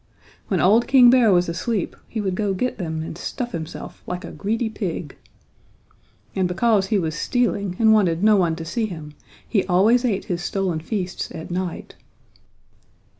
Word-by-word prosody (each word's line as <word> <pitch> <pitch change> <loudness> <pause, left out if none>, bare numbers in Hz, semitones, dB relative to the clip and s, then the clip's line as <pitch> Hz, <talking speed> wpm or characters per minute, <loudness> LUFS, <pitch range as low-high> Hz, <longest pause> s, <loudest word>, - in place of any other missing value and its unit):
When 190 - 0
old 220 +6 +4
King 250 -2 +7
Bear 245 -4 +5
was 180 -1 +3
asleep 185 +4 -2
he 225 - -5
would 195 -3 -1
go 200 0 -1
get 250 +5 -2
them 160 -3 -3
and 160 - -6
stuff 240 +7 -5
himself 165 -1 -7
like 180 0 -4
a - - -8
greedy 225 +3 -2
pig. 180 - -5 1.2
And 185 -1 +1
because 195 +2 +2
he 215 - +1
was 160 -4 -1
stealing 200 -1 -1
and 220 -1 +5
wanted 185 -5 +2
no 215 0 +6
one 175 -4 +2
to 165 0 -7
see 220 +7 -1
him 160 -6 -8 0.3
he 200 -5 +1
always 210 +7 +4
ate 215 -6 0
his 175 -1 -3
stolen 185 -2 -1
feasts 180 +1 -4
at 160 +1 -8
night. 180 -1 -4
190 Hz, 175 wpm, -22 LUFS, 175-220 Hz, 1.2 s, King